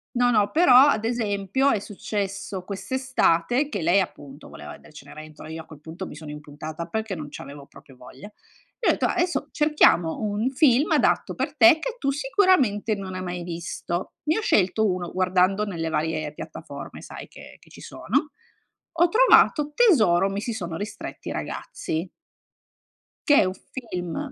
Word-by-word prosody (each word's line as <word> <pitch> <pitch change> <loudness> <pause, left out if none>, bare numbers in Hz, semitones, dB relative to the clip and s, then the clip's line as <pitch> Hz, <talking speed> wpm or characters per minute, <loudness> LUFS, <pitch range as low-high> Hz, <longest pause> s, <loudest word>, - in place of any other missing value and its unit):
No, 245 0 +3
no, 210 -3 +2
però 315 -6 +5
ad 220 -6 +1
esempio 225 +3 0
è 215 - +1
successo 200 -2 -5
quest'estate, 240 - 0
che 205 - -4
lei 175 +5 +3
appunto 145 -5 -8
voleva 75 0 -10
edere - - -18
Cenerentola, 155 0 -12
io 160 +1 -7
a - - -15
quel 155 -3 -14
punto 160 +5 -8
mi - - -10
sono 155 -2 -9
impuntata 150 +2 -8
perché 220 +2 -3
non 150 -2 -7
c'avevo 140 0 -10
proprio 135 - -17
voglia. 130 +6 -12 0.5
E 470 - -2
ho - - +7
detto: - - -1
"Ah, - - +1
adesso 350 0 -1
cerchiamo 300 - +3
un 215 +3 -1
film 275 0 +3
adatto - - +2
per - - -3
te 335 -1 +7
che - - -4
tu 275 - -1
sicuramente 270 - +2
non 190 -2 -7
hai 185 - -4
mai 175 -1 -5
visto". 170 +1 -5
Ne 315 +5 +1
ho - - -3
scelto 210 - +2
uno, 180 -3 -1
guardando 185 +2 +2
nelle 170 -6 -4
varie 155 -1 -2
piattaforme, - - -9
sai, - - -10
che - - -13
che - - -21
ci - - -14
sono. 300 -2 -2 0.7
Ho 345 - +5
trovato 345 -8 +4
"Tesoro, 215 - +4
mi 195 +1 -4
si 235 - -3
sono 175 -6 -5
ristretti 205 +4 -7
i - - -4
ragazzi" 175 - -5 1.2
che 290 - +6
è - - +4
un 185 - -2 0.4
film 180 -3 -4
195 Hz, 175 wpm, -24 LUFS, 165-255 Hz, 1.2 s, ho